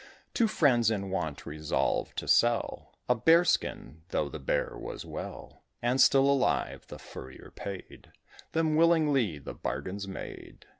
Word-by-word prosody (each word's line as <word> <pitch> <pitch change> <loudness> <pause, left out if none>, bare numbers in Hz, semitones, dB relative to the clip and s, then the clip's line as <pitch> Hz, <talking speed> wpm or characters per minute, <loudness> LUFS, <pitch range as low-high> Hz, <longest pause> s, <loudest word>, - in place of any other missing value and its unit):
Two 230 - +3
Friends, 125 - +3
in 100 -3 -2
want, 80 -6 -3
resolved 75 0 -1
to - - -3
sell 120 0 +2
A 125 - +5
Bear 165 +9 +5
skin, 80 - -1
though 75 - -1
the 80 - -7
Bear 65 - -1
was - - -7
well, - - -8 0.2
And 125 +2 +2
still 135 +1 +6
alive. 140 -2 +1
The - - -9
Furrier 65 0 -11
paid 100 -2 -9 0.4
Them 160 -1 +2
willingly; 150 - +3
the 70 - -8
bargain's 100 +2 -4
made. 95 - -9
120 Hz, 145 wpm, -29 LUFS, 90-145 Hz, 0.4 s, still